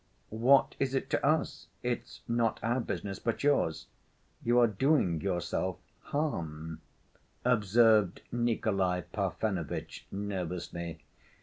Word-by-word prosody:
"What 125 +5 +4
is 135 0 0
it 135 +1 -2
to - - +1
us? 155 +3 +1 0.2
It's 120 0 -3
not 115 -2 +1
our 120 +3 +1
business, 100 -4 -4
but 115 +2 -2
yours. 140 - +2 0.6
You 120 +1 +3
are 120 - +7
doing 110 - +2
yourself 90 -4 -1 0.3
harm," 80 - -3 0.6
observed 110 -4 +4
Nikolay 100 -7 +1
Parfenovitch 95 -8 -3
nervously. 90 -4 -4
110 Hz, 105 wpm, -31 LUFS, 90-125 Hz, 0.6 s, are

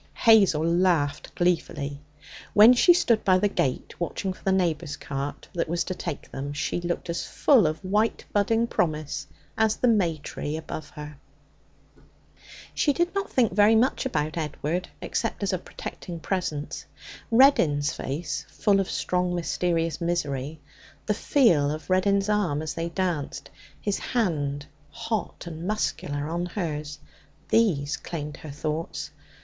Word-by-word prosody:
Hazel 195 -9 +5
laughed 170 -4 +1
gleefully. 145 -5 -1 0.5
When 215 +4 +9
she 250 +8 +6
stood 240 -10 +3
by 185 -1 +5
the 205 - +2
gate 135 -10 -1
watching 185 +2 -2
for - - -19
the 195 - +2
neighbour's 165 -5 0
cart 140 +1 -5
that 170 -2 -1
was 170 +1 0
to 185 - -4
take 145 - -6
them, 140 +2 -5
she 160 +3 -2
looked 175 +1 -3
as 170 - -2
full 245 - +4
of 155 +1 -1
white 210 +4 +1
budding 225 +3 +2
promise 150 -8 -2 0.3
as 220 -1 +3
the 250 - +1
may 185 -9 +3
tree 150 +1 -5
above 155 -1 -7
her. 150 -1 -8 1.6
She 290 - +2
did 345 +4 0
not 395 0 -2
think 240 -4 +3
very 210 +3 +5
much 240 +4 +2
about 155 - -2
Edward, 155 +3 -3
except 225 -2 -2
as 195 - 0
a 185 - 0
protecting 170 -1 -8
presence. 160 -4 -3 0.4
Reddin's 170 - +4
face, 150 +2 -4
full 200 -1 +2
of 195 - -1
strong, 180 0 0
mysterious 165 -1 -1
misery; 150 -4 -2 0.5
the 210 - +1
feel 190 - +3
of 155 +4 -5
Reddin's 195 +1 +3
arm 190 -8 +1
as 155 - -3
they 165 0 -3
danced; 170 -4 -3 0.3
his 205 -1 -1
hand, 145 - -1 0.2
hot 215 +5 -4
and 170 +1 -6
muscular, 155 -8 -2
on 170 +2 -2
hers 150 -6 -4 0.5
these 160 -9 +2
claimed 150 -5 -6
her 155 - -10
thoughts. 155 +3 -4
170 Hz, 145 wpm, -26 LUFS, 150-200 Hz, 1.6 s, When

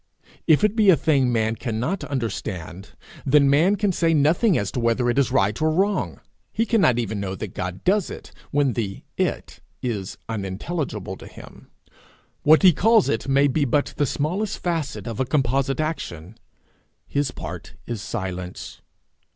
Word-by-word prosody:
If 160 +3 +5
it 210 0 +3
be 215 -3 +4
a 185 - +8
thing 135 -4 +2
man 110 -1 +1
cannot 120 - -3
understand, 100 - -5 0.3
then 140 +1 +4
man 170 +8 +4
can 205 0 +1
say 165 -2 +2
nothing 160 +7 +3
as 100 - -2
to - - -3
whether 120 +1 +1
it 135 - +1
is 135 -2 +2
right 105 -1 +1
or 155 - +3
wrong. 195 +6 0 0.3
He 225 - 0
cannot 195 - +3
even 110 -3 -2
know 95 -1 -3
that 100 -1 -6
God 90 0 -5
does 195 0 +2
it, - - -9 0.2
when 145 -3 +1
the 100 -4 -4
it - - -2 0.2
is 105 -7 -3
unintelligible 105 - -4
to - - -11
him. - - -14 0.7
What 155 +4 +5
he 185 -2 +8
calls 220 +5 +4
it 115 +3 -1
may 140 +1 +4
be 145 +2 +1
but 140 +2 0
the 145 - +2
smallest 180 - -2
facet 165 -5 -3
of 115 -3 -5
a 130 - +1
composite 135 0 0
action. 110 - -4 0.7
His 145 -1 -1
part - - -8
is 115 -4 -4
silence. 90 -2 -6
135 Hz, 165 wpm, -23 LUFS, 110-160 Hz, 0.7 s, a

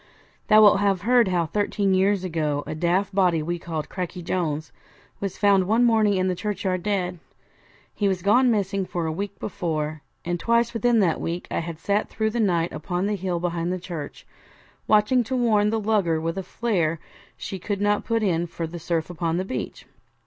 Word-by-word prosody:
Thou 215 -1 +7
wilt 205 -1 +6
have 200 -2 +1
heard 240 +1 +4
how 175 -2 +1
thirteen 205 +2 0
years 190 +1 +2
ago 155 -5 -1
a - - -4
daft 175 +5 0
body 180 -5 +2
we 175 +2 -3
called 160 -3 -4
Cracky 180 -1 -5
Jones 160 -4 -2 0.5
was 195 -2 -4
found 200 -3 +3
one 225 +4 +3
morning 220 -3 +3
in 185 0 +1
the 185 - +1
churchyard 190 -1 -2
dead. 180 -3 -2 0.7
He 205 - 0
was 185 -3 -1
gone 245 +5 +4
missing 200 -3 0
for 170 -2 -3
a 160 - -1
week 200 +4 -5
before, 155 -5 -3 0.2
and 175 0 -2
twice 235 +4 +2
within 230 0 +2
that 170 -5 +1
week 170 +2 -3
I - - 0
had 165 -1 -5
sat 200 +5 -1
through 220 -1 -1
the 240 - -2
night 175 -6 +1
upon 175 +3 -2
the 210 +1 0
hill 185 -2 -2
behind 170 0 -2
the 185 - -2
church, 165 -5 -7 0.6
watching 215 +4 +4
to 260 - -2
warn 215 -4 +3
the 225 +1 0
lugger 200 -7 +1
with 165 +1 -2
a - - -2
flare 180 -5 -1 0.4
she 190 - -6
could 200 +2 -3
not 205 0 +1
put 230 -1 0
in 175 -3 +1
for 170 0 -5
the 170 +2 -7
surf 165 -1 -1
upon 170 -1 -1
the 185 - -1
beach. 130 -9 -5
185 Hz, 200 wpm, -24 LUFS, 170-210 Hz, 0.7 s, Thou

